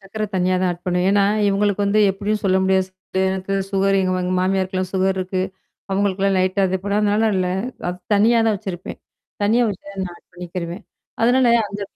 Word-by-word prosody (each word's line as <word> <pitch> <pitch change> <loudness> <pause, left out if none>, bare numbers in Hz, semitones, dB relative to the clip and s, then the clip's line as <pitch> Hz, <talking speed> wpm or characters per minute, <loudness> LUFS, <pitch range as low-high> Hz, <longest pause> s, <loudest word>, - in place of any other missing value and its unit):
சர்க்கரை 215 +2 -4
தனியா 185 0 +1
தான் 185 - +2
ஆட் 175 0 -12
பண்ணுவ. 180 0 +1
ஏன்னா, 200 0 +4 0.2
இவங்களுக்கு 205 0 +1
வந்து 210 +2 +3
எப்படியும் 205 +2 -2
சொல்ல 190 -1 +3
முடியாது 190 0 +2 0.4
எனக்கு 190 +1 -3 0.2
சுகர் 195 0 +2
எங்க 185 -1 0
எங்க 180 0 -1
மாமியாருக்கல்லாம் 185 0 -1
சுகர் 190 0 +1
இருக்கு. 185 0 -2 0.5
அவங்களுக்கெல்லாம் 195 0 +1
லைட்டா 185 +2 +1
அதுப்படதுனால 205 +3 +1
இல்ல, 185 -1 +1 0.4
அது 180 0 -4 0.2
தனியா 225 +4 +4
தான் 215 -2 +2
வச்சிருப்பேன். 190 -2 -7 0.4
தனியா 225 +4 +3
வச்சு 200 -1 -9 0.2
நான் 175 - -9
ஆ - - -20
பண்ணிக்கிறுவேன். 175 +2 -6 0.4
அதனால 250 +2 +4 0.2
அந்த 205 +1 -7
195 Hz, 165 wpm, -21 LUFS, 185-205 Hz, 0.5 s, ஏன்னா